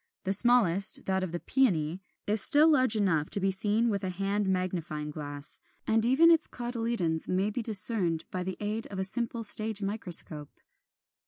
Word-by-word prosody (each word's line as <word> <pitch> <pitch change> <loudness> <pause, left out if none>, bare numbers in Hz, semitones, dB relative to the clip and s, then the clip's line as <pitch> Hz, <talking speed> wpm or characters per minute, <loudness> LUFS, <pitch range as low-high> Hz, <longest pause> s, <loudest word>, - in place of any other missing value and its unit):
The 190 - 0
smallest, 200 -4 +4
that 190 0 -2
of 185 -3 -5
the 175 - -5
Peony, 180 - -1 0.2
is 210 0 +3
still 295 +7 +8
large 255 -6 +2
enough 175 -8 -1
to - - -2
be 195 0 -1
seen 210 +4 0
with 200 -3 -3
a 185 - -3
hand 195 +2 -3
magnifying 175 -5 -4
glass, 145 -1 -7 0.3
and 220 0 0
even 275 +8 +4
its 325 -2 +2
cotyledons 230 -9 -4
may 190 +3 -1
be 240 - -5
discerned 195 -6 +2
by 185 - -5
the 185 0 -6
aid 215 +2 -5
of 195 - -10
a 190 - -2
simple 235 +3 -2
stage 215 -1 0
microscope. 175 -7 -3
200 Hz, 175 wpm, -27 LUFS, 180-225 Hz, 0.3 s, still